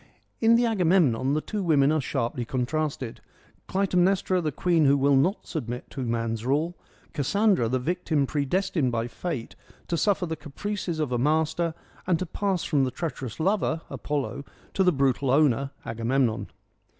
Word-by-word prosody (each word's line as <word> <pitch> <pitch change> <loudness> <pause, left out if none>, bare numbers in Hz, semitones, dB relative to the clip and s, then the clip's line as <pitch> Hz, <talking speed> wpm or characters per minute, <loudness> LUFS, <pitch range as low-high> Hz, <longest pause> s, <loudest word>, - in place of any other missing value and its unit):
In 225 0 +5
the 240 +1 +3
Agamemnon 165 - +2
the 155 - 0
two 210 +4 -4
women 150 -5 +3
are 155 -1 +1
sharply 120 -1 -2
contrasted; 130 0 -2 0.5
Clytemnestra, 185 -1 +2
the 155 -2 -1
queen 165 +1 +2
who 140 +1 +5
will 140 +1 +3
not 175 +10 +1
submit 125 -6 -5
to 135 - -5
man's 115 -2 -2
rule; 150 +7 0 0.4
Cassandra, 185 - +2
the 130 - +1
victim 155 +1 0
predestined 150 0 0
by 115 0 -1
fate 130 -2 -5 0.3
to 170 - 0
suffer 195 0 +1
the 160 -1 -3
caprices 175 +3 -4
of 150 -5 -1
a 120 - 0
master, 160 +4 +1 0.3
and 180 -3 +3
to 185 - -3
pass 190 +1 -1
from 145 -4 +2
the 130 - +1
treacherous 130 -4 -5
lover, 170 -2 +1
Apollo, 145 -1 -3 0.3
to 190 - +2
the 180 - +5
brutal 135 -2 +1
owner, 140 -1 +3 0.2
Agamemnon. 115 +1 0
150 Hz, 160 wpm, -26 LUFS, 130-180 Hz, 0.5 s, In